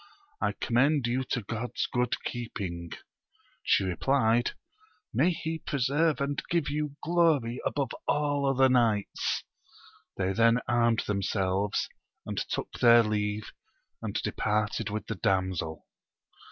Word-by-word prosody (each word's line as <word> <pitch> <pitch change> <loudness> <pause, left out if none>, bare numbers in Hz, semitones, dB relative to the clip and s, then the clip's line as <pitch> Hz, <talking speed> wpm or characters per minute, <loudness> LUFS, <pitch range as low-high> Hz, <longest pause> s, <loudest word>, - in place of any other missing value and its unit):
I - - +1
commend 135 +3 +2
you 125 +2 0
to 125 - -2
God's 115 +4 -3
good 125 -1 0
keeping, 95 -8 -5 0.7
she - - +3
replied: 120 +5 +2 0.6
may - - +4
he 160 -2 -3
preserve 145 +3 +1
and 140 +1 -1
give 170 -4 0
you 150 -1 -2
glory 155 -8 +2
above 140 -4 -2 0.2
all 145 -1 +1
other 135 0 +4
knights! 115 -5 +1 0.7
They 95 0 0
then 115 +2 +4
armed 115 -2 +3
themselves, 100 0 0 0.4
and - - -4
took - - -3
their 120 -1 +7
leave, 105 0 -2 0.5
and - - -4
departed 105 0 -1
with 105 +1 -4
the - - -3
damsel. 95 -5 -1
120 Hz, 120 wpm, -29 LUFS, 105-140 Hz, 0.7 s, their